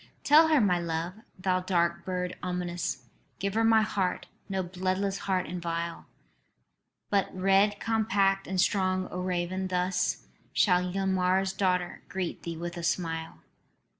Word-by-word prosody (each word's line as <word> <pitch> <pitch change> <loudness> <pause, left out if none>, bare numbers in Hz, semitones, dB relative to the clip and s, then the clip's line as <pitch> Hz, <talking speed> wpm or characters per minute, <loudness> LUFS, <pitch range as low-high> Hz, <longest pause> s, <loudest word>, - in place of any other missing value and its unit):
"Tell 310 +2 +7
her 310 -2 +4
my 185 -6 +3
love, 170 +1 -2 0.2
thou 185 0 +1
dark 170 -2 0
bird 180 -1 -2
ominous; 175 -7 -3 0.3
Give 200 0 -2
her 225 +1 +2
my 225 -1 +5
heart, 195 -3 -1 0.2
no 190 -1 -1
bloodless 185 +2 -1
heart 185 -1 +1
and 175 +2 -5
vile 170 0 -4 1.0
But 200 -1 +2
red 195 +2 +3
compact 200 -3 +1
and 190 -1 -2
strong, 185 0 +2
O 180 - -4
raven. 180 +1 -1
Thus 180 0 0 0.3
Shall 180 -2 +3
Ylmer's 190 0 +1
daughter 180 -2 0
greet 185 -2 -3
thee 165 -1 -5
with 175 +1 -5
a 170 - -5
smile. 165 -1 -2
185 Hz, 140 wpm, -29 LUFS, 175-195 Hz, 1.0 s, Tell